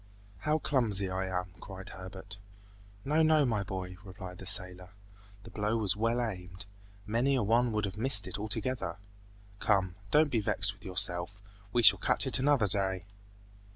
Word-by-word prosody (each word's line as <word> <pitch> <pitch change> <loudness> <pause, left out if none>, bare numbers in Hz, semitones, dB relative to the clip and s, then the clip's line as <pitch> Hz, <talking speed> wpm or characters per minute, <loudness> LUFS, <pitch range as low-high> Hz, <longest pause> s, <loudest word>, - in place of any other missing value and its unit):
"How 150 +9 +1
clumsy 110 -11 0
I 95 +1 -2
am!" 90 -1 -3
cried 95 -1 -9
Herbert. 95 +2 -10 0.7
"No, 150 +3 +2
no, 155 -2 +4
my 110 -5 0
boy!" 95 -2 -6
replied 95 -2 -10
the 95 - -9
sailor. 90 -1 -3 0.5
"The - - -12
blow 105 +2 -1
was 105 -4 +1
well 115 +3 0
aimed; 90 -4 -5 0.4
many 120 +6 +1
a 125 - +1
one 115 +3 +2
would 105 -1 -1
have 100 +1 -6
missed 110 -4 +5
it - - -5
altogether! 110 +2 -3 0.6
Come, 95 -5 +1 0.2
don't 150 +4 +3
be 115 - +1
vexed 100 -1 +2
with 95 - -22
yourself. 95 0 +2 0.3
We 120 +2 +1
shall - - +8
catch - - +1
it - - +3
another 135 -5 +3
day!" 95 -2 -2
105 Hz, 165 wpm, -30 LUFS, 95-115 Hz, 0.7 s, shall